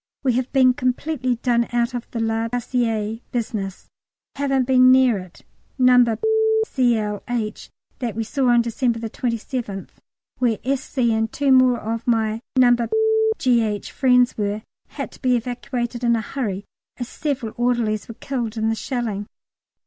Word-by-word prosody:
We 260 -3 +2
have 255 +1 -1
been 260 -2 +5
completely 255 0 -1
done 235 0 +1
out 240 +1 0
of 245 -1 -5
the 235 - -4
La 225 0 0
Bassée 225 -2 -1
business; 215 -5 -3 0.5
haven't 275 -2 +1
been 255 0 +6
near 255 -5 +4
it. 185 -1 -13 0.3
No. 250 -3 +5 0.5
Cl. 225 - 0
H. 225 -3 -3 0.3
that 235 -5 -3
we 225 - -1
saw 260 +4 -1
on 240 -1 +4
December 235 0 0
27th, 230 -2 -4 0.5
where 240 -4 +2
S.C. 260 -3 0
and 225 0 0
two 280 -1 +1
more 255 -2 +5
of 225 +2 -4
my 225 -1 +1
No. 245 -2 +6 0.6
G.H. 225 -5 +1
friends 250 -2 +3
were, 205 +1 -2 0.2
had - - -6
to - - -17
be 255 -2 +3
evacuated 240 0 -3
in 235 -1 +3
a 225 - -1
hurry, 210 -5 -4 0.3
as 245 - -4
several 270 -6 -3
orderlies 235 -3 0
were 230 - -9
killed 235 -4 -4
in 220 0 +1
the 225 - 0
shelling. 225 -5 -3
240 Hz, 150 wpm, -22 LUFS, 225-255 Hz, 0.6 s, been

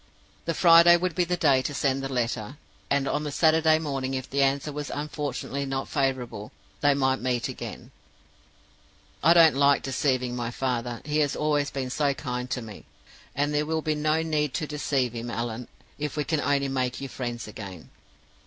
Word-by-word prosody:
The 165 - -1
Friday 170 0 +7
would 180 0 -1
be 180 +1 +1
the 180 +1 -1
day 140 -6 +4
to 145 +2 -4
send 135 -1 0
the 135 0 -4
letter, 120 0 -2 0.3
and 140 -1 +1
on 150 +2 -1
the 150 - -3
Saturday 160 +1 +4
morning 135 -4 -3
if 130 -1 -4
the 140 +1 0
answer 140 +2 +1
was 145 0 -5
unfortunately 145 -2 -4
not 135 -1 -3
favorable, 130 -7 -2 0.3
they 145 -1 +3
might 130 -1 +1
meet 125 -2 0
again, - - -8 1.3
'I 165 - +6
don't 165 -4 +7
like 140 0 +4
deceiving 130 -2 0
my 120 -1 -3
father; 120 -1 -3
he 150 +1 0
has 145 -2 +1
always 150 -1 +1
been 130 -2 -4
so 145 -1 +1
kind 125 -2 -4
to 125 - -3
me. 110 -3 -11 0.5
And 145 +2 0
there 150 +1 0
will 160 0 -1
be 155 - +1
no 155 +1 +1
need 150 -4 -1
to 155 - -1
deceive 140 -4 -1
him, 120 0 -5
Allan, 115 0 -4 0.3
if 150 0 -3
we 150 - +1
can 155 0 -1
only 140 -1 +1
make 130 -2 -1
you 135 - -5
friends 120 -3 -5
again. 100 -5 -9
140 Hz, 190 wpm, -26 LUFS, 125-150 Hz, 1.3 s, Friday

